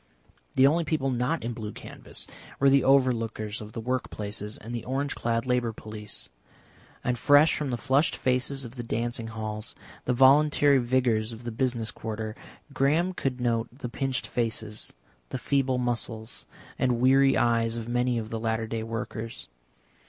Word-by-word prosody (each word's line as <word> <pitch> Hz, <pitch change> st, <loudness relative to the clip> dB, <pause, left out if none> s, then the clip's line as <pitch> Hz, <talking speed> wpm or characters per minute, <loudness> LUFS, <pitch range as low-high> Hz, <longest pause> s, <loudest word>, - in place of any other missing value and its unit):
The 130 Hz, -, +5 dB
only 165 Hz, +5 st, +4 dB
people 140 Hz, -3 st, 0 dB
not 125 Hz, +6 st, 0 dB
in 120 Hz, +1 st, -2 dB
blue 110 Hz, -2 st, -5 dB
canvas -, -, -6 dB, 0.3 s
were 140 Hz, 0 st, +5 dB
the 140 Hz, 0 st, +6 dB
overlookers 115 Hz, -6 st, +2 dB
of 105 Hz, 0 st, -9 dB
the -, -, -4 dB
work 125 Hz, +3 st, -2 dB
places 105 Hz, 0 st, -4 dB
and 115 Hz, +3 st, -8 dB
the 120 Hz, -, -3 dB
orange 135 Hz, +2 st, -1 dB
clad 115 Hz, +1 st, -1 dB
Labour 125 Hz, -2 st, +1 dB
Police. 105 Hz, -1 st, -6 dB, 0.8 s
And 125 Hz, -1 st, 0 dB
fresh 145 Hz, +2 st, +6 dB
from 150 Hz, -2 st, -2 dB
the 120 Hz, -, -1 dB
flushed 135 Hz, +5 st, +2 dB
faces 130 Hz, +1 st, 0 dB
of 120 Hz, +2 st, -9 dB
the -, -, -2 dB
dancing 115 Hz, 0 st, -2 dB
halls, 110 Hz, -1 st, -5 dB, 0.3 s
the 125 Hz, -, +2 dB
voluntary 140 Hz, +2 st, +5 dB
vigours 120 Hz, -3 st, +1 dB
of 115 Hz, +1 st, -10 dB
the 120 Hz, -, -4 dB
business 120 Hz, -1 st, -1 dB
quarter, 110 Hz, -1 st, -5 dB, 0.4 s
Graham 160 Hz, +8 st, +2 dB
could 135 Hz, -7 st, -2 dB
note 115 Hz, -2 st, +1 dB
the 125 Hz, 0 st, -7 dB
pinched 135 Hz, +1 st, -2 dB
faces, 110 Hz, -3 st, -1 dB, 0.4 s
the -, -, -3 dB
feeble 135 Hz, -2 st, +1 dB
muscles, 115 Hz, -, -3 dB, 0.3 s
and 125 Hz, -2 st, +2 dB
weary 135 Hz, +2 st, +5 dB
eyes 115 Hz, -1 st, +2 dB
of 115 Hz, -1 st, -5 dB
many 120 Hz, 0 st, +1 dB
of 110 Hz, -1 st, -4 dB
the 115 Hz, -, -2 dB
latter 110 Hz, 0 st, -1 dB
day 110 Hz, 0 st, -3 dB
workers. 115 Hz, -, -5 dB
120 Hz, 165 wpm, -27 LUFS, 115-135 Hz, 0.8 s, the